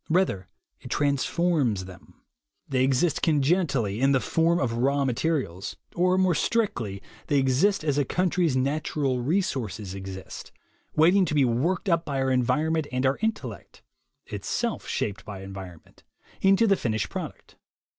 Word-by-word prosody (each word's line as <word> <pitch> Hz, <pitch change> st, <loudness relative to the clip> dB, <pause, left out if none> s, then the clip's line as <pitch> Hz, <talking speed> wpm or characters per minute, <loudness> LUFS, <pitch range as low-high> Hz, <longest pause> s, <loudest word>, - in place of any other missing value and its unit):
Rather, 160 Hz, -, +1 dB, 0.3 s
it -, -, -11 dB
transforms 140 Hz, -, +1 dB
them. 90 Hz, -1 st, -15 dB, 0.4 s
They 130 Hz, -2 st, +1 dB
exist 135 Hz, +5 st, +2 dB
congenitally 140 Hz, -, +1 dB
in 135 Hz, +1 st, +4 dB
the 135 Hz, -, +4 dB
form 165 Hz, +5 st, +2 dB
of 120 Hz, -4 st, 0 dB
raw 140 Hz, +2 st, +2 dB
mate 125 Hz, -3 st, -2 dB
rials; 115 Hz, -, -1 dB, 0.2 s
or 180 Hz, +1 st, +3 dB
more 185 Hz, -1 st, +3 dB
strictly, 120 Hz, -, -1 dB, 0.2 s
they 145 Hz, -, +2 dB
exist 140 Hz, +9 st, +2 dB
as 145 Hz, -2 st, +1 dB
a -, -, +3 dB
country's 175 Hz, -2 st, +1 dB
"natural 135 Hz, -1 st, 0 dB
resources" 120 Hz, -, -2 dB
exist, 95 Hz, -1 st, -8 dB, 0.4 s
waiting 180 Hz, +5 st, +5 dB
to 155 Hz, -, -2 dB
be 140 Hz, -3 st, +4 dB
worked 140 Hz, -, 0 dB
up 165 Hz, -2 st, +2 dB
by 140 Hz, -4 st, -3 dB
our 135 Hz, 0 st, +1 dB
environment 150 Hz, +5 st, +1 dB
and 130 Hz, +1 st, -1 dB
our 130 Hz, +1 st, +1 dB
intellect 210 Hz, -, -4 dB, 0.4 s
(itself -, -, -3 dB
shaped 100 Hz, -, -2 dB
by 100 Hz, -2 st, -8 dB
environment) 95 Hz, -4 st, -10 dB, 0.4 s
into 195 Hz, +4 st, +5 dB
the 200 Hz, -3 st, +4 dB
finished 110 Hz, -, -2 dB
product. -, -, -7 dB
140 Hz, 145 wpm, -26 LUFS, 115-170 Hz, 0.4 s, waiting